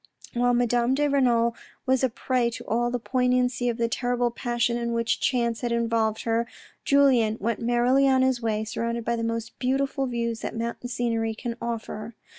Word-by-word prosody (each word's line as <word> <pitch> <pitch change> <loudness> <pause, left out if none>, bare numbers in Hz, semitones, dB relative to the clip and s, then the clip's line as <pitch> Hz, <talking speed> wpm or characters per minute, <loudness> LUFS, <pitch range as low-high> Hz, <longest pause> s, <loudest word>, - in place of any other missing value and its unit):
While 245 0 +2
Madame 240 +1 +2
de 295 +1 +2
Renal 240 -4 +2 0.3
was 260 0 +2
a 260 - +3
prey 240 +1 0
to 235 - -8
all 240 +2 0
the 245 - -1
poignancy 250 0 +1
of 235 - -2
the 235 -1 +1
terrible 245 0 0
passion 240 0 -1
in 235 0 -2
which 230 0 0
chance 235 -3 0
had 240 -2 -2
involved 230 -2 0
her, 230 +1 0 0.4
Julien 255 -6 +4
went 225 +1 -1
merrily 245 +3 +3
on 260 -1 +4
his 260 -2 +1
way, 220 -1 -1
surrounded 230 +1 -3
by 235 - +1
the 230 - -3
most 230 0 -4
beautiful 270 +1 0
views 235 -2 -2
that - - -5
mountain 235 +1 -4
scenery 230 -2 -1
can 235 +1 -4
offer. 230 -1 -5
235 Hz, 185 wpm, -25 LUFS, 230-250 Hz, 0.4 s, Julien